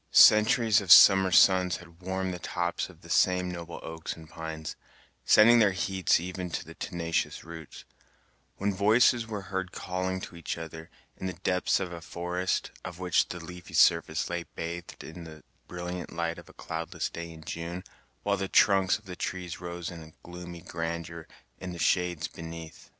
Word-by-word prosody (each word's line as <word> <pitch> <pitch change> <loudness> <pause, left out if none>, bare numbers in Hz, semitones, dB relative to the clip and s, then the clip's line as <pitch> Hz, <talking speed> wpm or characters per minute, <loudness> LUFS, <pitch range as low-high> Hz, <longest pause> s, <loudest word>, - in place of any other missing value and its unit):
Centuries 110 0 +6
of 95 -3 -1
summer 95 -1 +9
suns 90 -1 +5
had 85 0 -16
warmed 95 0 -2
the 90 - -6
tops 85 0 -2
of - - -17
the - - -14
same 90 0 +3
noble 85 -1 -7
oaks 80 0 -5
and 80 -1 -13
pines, 80 -1 -6 0.5
sending 115 +2 +7
their 105 -4 +4
heats 95 -2 +1
even 90 +1 -5
to - - -4
the - - -11
tenacious 85 -1 -2
roots, 80 -1 -10 0.7
when 100 +1 0
voices 110 +4 +4
were 105 -2 -4
heard 95 -1 -2
calling 95 +1 -3
to 90 - -9
each 85 - -4
other, 80 0 -8 0.3
in 95 - -4
the 95 - -3
depths 90 0 0
of 95 -2 -4
a 85 -1 -7
forest, 90 +3 -2
of 90 - -7
which 90 -2 +1
the 90 - -5
leafy 90 +1 -10
surface 85 -1 +3
lay 85 0 -2
bathed 85 +1 -6
in 85 +2 -9
the 80 -2 -12 0.2
brilliant 90 0 -6
light 85 0 -3
of - - -15
a - - -15
cloudless 80 0 -4
day 85 0 -7
in 80 -1 -12
June, 85 +3 -5 0.4
while 100 0 +1
the 95 0 -2
trunks 95 -1 +4
of 110 - -22
the 90 -1 -7
trees 90 -1 -5
rose 85 -1 -5
in 80 -2 -11
gloomy 85 -1 -9
grandeur 85 -1 -5 0.3
in 90 -1 -6
the - - -7
shades 85 0 +1
beneath. 80 -1 -10
90 Hz, 175 wpm, -28 LUFS, 85-95 Hz, 0.7 s, summer